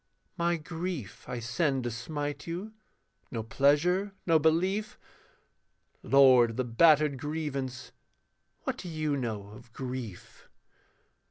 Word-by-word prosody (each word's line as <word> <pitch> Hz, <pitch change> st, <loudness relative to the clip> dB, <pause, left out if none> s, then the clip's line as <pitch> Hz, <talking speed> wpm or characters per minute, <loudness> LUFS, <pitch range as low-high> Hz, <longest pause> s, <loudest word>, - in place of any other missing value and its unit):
My 170 Hz, -1 st, +1 dB
grief 165 Hz, -, -5 dB
I 125 Hz, -, -3 dB
send 130 Hz, +3 st, 0 dB
to 120 Hz, -, -2 dB
smite 145 Hz, +7 st, -4 dB
you, 185 Hz, +6 st, -5 dB, 0.6 s
no 115 Hz, -3 st, -4 dB
pleasure, 170 Hz, -, +2 dB
no 165 Hz, -2 st, +4 dB
belief, 185 Hz, +8 st, +1 dB, 1.0 s
Lord 130 Hz, -3 st, +6 dB
of 115 Hz, -, -7 dB
the 130 Hz, -, +1 dB
battered 150 Hz, +3 st, +4 dB
grievance, 140 Hz, -4 st, -4 dB, 0.7 s
what -, -, -2 dB
do 180 Hz, -, -7 dB
you 155 Hz, -2 st, -1 dB
know 110 Hz, -6 st, -4 dB
of 110 Hz, +3 st, -14 dB
grief? 125 Hz, -8 st, -7 dB
145 Hz, 115 wpm, -29 LUFS, 125-165 Hz, 1.0 s, Lord